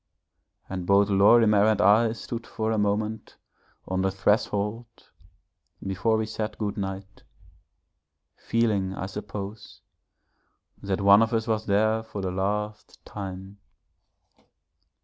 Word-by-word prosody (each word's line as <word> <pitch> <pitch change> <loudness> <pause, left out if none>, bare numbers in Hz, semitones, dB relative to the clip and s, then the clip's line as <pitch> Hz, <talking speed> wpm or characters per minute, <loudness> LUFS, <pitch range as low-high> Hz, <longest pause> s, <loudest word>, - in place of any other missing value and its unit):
And 90 -2 -5
both 100 +1 +4
Lorimer 105 +1 +5
and 110 -1 +2
I 110 +2 +4
stood 115 0 -7
for 110 0 -2
a 110 - 0
moment 105 +1 -2 0.5
on 95 0 -1
the 95 - +1
threshold 105 +3 0 1.0
before 100 +4 0
we 110 - -1
said 110 0 -5
good 105 -2 -3
night, 95 0 -6 1.1
feeling 105 -5 0
I 95 - -4
suppose 105 +1 -8 1.0
that 100 0 -2
one 100 +2 +7
of 115 +1 +1
us 110 -1 0
was 110 -1 -2
there 110 +2 +2
for 110 -2 -8
the 95 -1 -2
last 105 +3 -4
time. 95 0 -8
105 Hz, 120 wpm, -26 LUFS, 100-110 Hz, 1.1 s, one